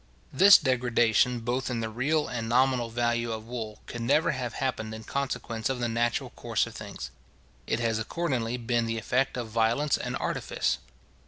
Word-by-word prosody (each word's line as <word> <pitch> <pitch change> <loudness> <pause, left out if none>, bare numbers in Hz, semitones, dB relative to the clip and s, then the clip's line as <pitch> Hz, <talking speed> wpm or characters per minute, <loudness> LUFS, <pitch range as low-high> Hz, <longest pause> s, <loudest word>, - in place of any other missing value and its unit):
This 195 +8 +9
degradation, 120 -1 +2
both 125 +3 -1
in 120 -2 -2
the 115 - -2
real 145 +7 0
and 115 -2 -4
nominal 125 -1 +3
value 120 0 0
of 110 -1 -5
wool, 115 -3 -6
could 120 - -6
never 150 +8 +3
have 125 -4 -4
happened 110 -5 -2
in 110 - -9
consequence 125 -3 -3
of 130 -2 -2
the 120 - 0
natural 120 0 0
course - - -1
of - - -10
things. - - -7 0.6
It 110 - 0
has 115 -1 +1
accordingly 125 -2 -1
been 115 -1 0
the 115 0 -2
effect 125 +5 0
of 120 -2 -4
violence 115 +6 +1
and - - -3
artifice. - - -1
120 Hz, 175 wpm, -28 LUFS, 115-130 Hz, 0.6 s, This